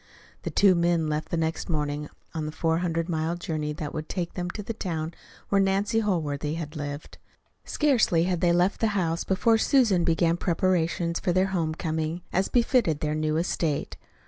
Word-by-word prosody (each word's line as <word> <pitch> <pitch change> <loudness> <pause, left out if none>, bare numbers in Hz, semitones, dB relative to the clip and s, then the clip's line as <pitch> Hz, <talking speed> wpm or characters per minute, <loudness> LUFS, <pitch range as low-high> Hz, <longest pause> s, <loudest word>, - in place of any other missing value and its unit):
The - - -4
two 200 -2 +5
men 170 -2 +2
left 150 +1 -2
the 170 - -1
next 160 +2 -2
morning 150 -2 -2 0.2
on 155 -2 -3
the - - -4
four 165 +1 0
hundred 165 -2 -1
mile 160 0 -1
journey 155 -4 -3
that 150 -1 -5
would 155 0 -5
take 175 -3 -3
them 180 -1 -3
to 210 +3 -6
the 230 - -4
town 165 -6 -3 0.4
where 200 -1 +3
Nancy 195 +4 +1
Holworthy 155 -7 -1
had 160 -1 -6
lived. 145 0 -6 0.5
Scarcely 240 - +2
had 180 -1 -1
they 175 - +4
left 175 +3 +2
the 215 -2 +1
house 170 -2 0
before 225 +4 +2
Susan 220 -10 +3
began 170 0 +2
preparations 170 -1 0
for 180 - 0
their 185 +2 +2
home 160 -3 0
coming, 160 +1 -2
as 190 +2 +2
befitted 235 - +2
their 150 0 0
new 155 0 0
estate. 165 -3 -1
170 Hz, 185 wpm, -26 LUFS, 155-185 Hz, 0.5 s, two